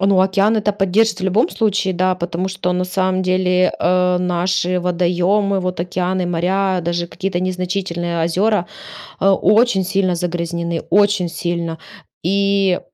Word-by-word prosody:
Ну 195 -1 +3
океан 195 +3 +2
это 210 -1 0
поддержит 200 +1 +1
в 185 - -3
любом 205 - +2
случае, 205 -3 0
да, 185 +1 +1
потому 180 +1 -3
что 185 -1 -2
на 180 0 -1
самом 185 0 -1
деле, 185 0 +2
э, 180 0 +2
наши 180 0 0
водоёмы, 180 +3 +1
вот 180 -1 -3
океаны 180 +1 -2
и - - -2
моря, 185 +2 0
даже 170 0 -1
какие-то 185 +1 -3
незначительные 180 -2 -2
озёра, 185 +4 +1 0.5
а, 195 0 +4
очень 210 0 +3
сильно 190 -1 0
загрязнены, 170 -1 -3
очень 205 -2 +3
сильно. 170 -1 -3 0.5
И, 195 -1 +1
185 Hz, 145 wpm, -18 LUFS, 175-195 Hz, 0.5 s, а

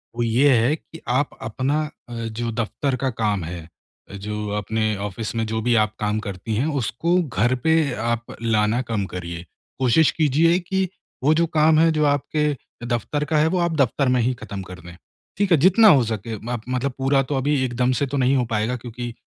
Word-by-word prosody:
वो 120 - -1
ये 120 +5 +3
है 120 +6 +3
कि 165 0 -14
आप 135 +3 +1
अपना 130 +7 -1 0.3
अ, - - -7
जो 115 0 -4
दफ़्तर 120 +4 -2
का 135 - +2
काम 105 -4 +1
है 85 +1 -6 0.5
अ, - - -11
जो 105 +1 -5
अपने 110 +1 -1
ऑफ़िस 105 +3 -5
में 115 0 0
जो 110 +1 -2
भी 120 +1 +2
आप 105 0 -13
काम 105 0 0
करती 100 +3 -4
हैं, 120 +7 +1
उसको 160 +5 0
घर 120 - +1
पे 160 -3 +3
आप 120 +1 -3
लाना 110 +1 +1
कम 105 -3 0
करिए। 85 -1 -6 0.3
कोशिश 135 +5 +4
कीजिए 160 +3 +3
कि 190 +1 -1 0.4
वो 150 +3 +5
जो 170 +2 +2
काम 155 +1 +5
है 165 0 +5
जो 155 -1 +1
आपके 150 +1 +1 0.3
दफ़्तर 120 +5 -1
का 155 +1 0
है 150 +1 +4
वो 180 +3 0
आप 170 -1 0
दफ़्तर 140 0 +2
में 125 - +2
ही 125 +3 +1
ख़त्म 100 -1 -6
कर 90 -1 -10
दें। 85 +1 -12 0.4
ठीक 200 -1 0
है? 170 - +7
जितना 190 +9 +6
हो 140 -9 +6
सके 110 0 -4
माप 120 -1 -3
मतलब 130 +2 -1
पूरा 135 +1 +2
तो 140 +2 -3
अभी 135 +1 +1
एकदम 125 0 0
से 140 - +1
तो 140 +2 -3
नहीं 130 +1 +3
हो 125 -2 +1
पाएगा 115 +2 -1
क्योंकि 120 0 -7
125 Hz, 210 wpm, -22 LUFS, 110-150 Hz, 0.5 s, है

